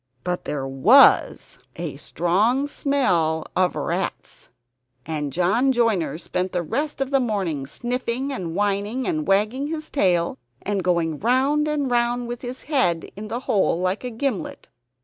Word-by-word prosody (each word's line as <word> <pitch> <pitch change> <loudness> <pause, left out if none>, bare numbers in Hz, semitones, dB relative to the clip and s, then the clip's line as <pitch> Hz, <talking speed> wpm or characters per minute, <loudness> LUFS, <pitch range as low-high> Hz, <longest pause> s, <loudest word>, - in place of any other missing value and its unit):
But 180 0 -3
there 140 -2 -3
was 195 - +5 0.2
a 165 -5 -5
strong 210 - +1
smell 180 - +1
of 185 -1 +2
rats; - - -4 0.6
and 150 -3 -3
John 195 - +2
Joiner 225 -11 +1
spent 180 +2 -3
the 175 -1 0
rest 285 - -3
of 270 0 -1
the 275 - +4
morning 190 - -2
sniffing 250 - -3
and 170 -9 -5
whining, 205 +5 -1
and 310 -3 -1
wagging 215 +8 +1
his 310 0 -5
tail, 175 - +1 0.2
and 200 -2 -1
going 170 -4 0
round 270 +6 +2
and 290 -4 -1
round 240 0 +1
with 240 0 -6
his 250 +1 -7
head 255 - 0
in 210 +2 -7
the 235 +4 -4
hole 195 -8 +1
like 185 +5 -1
a 250 - -3
gimlet. 240 -1 -4
215 Hz, 150 wpm, -23 LUFS, 175-260 Hz, 0.6 s, was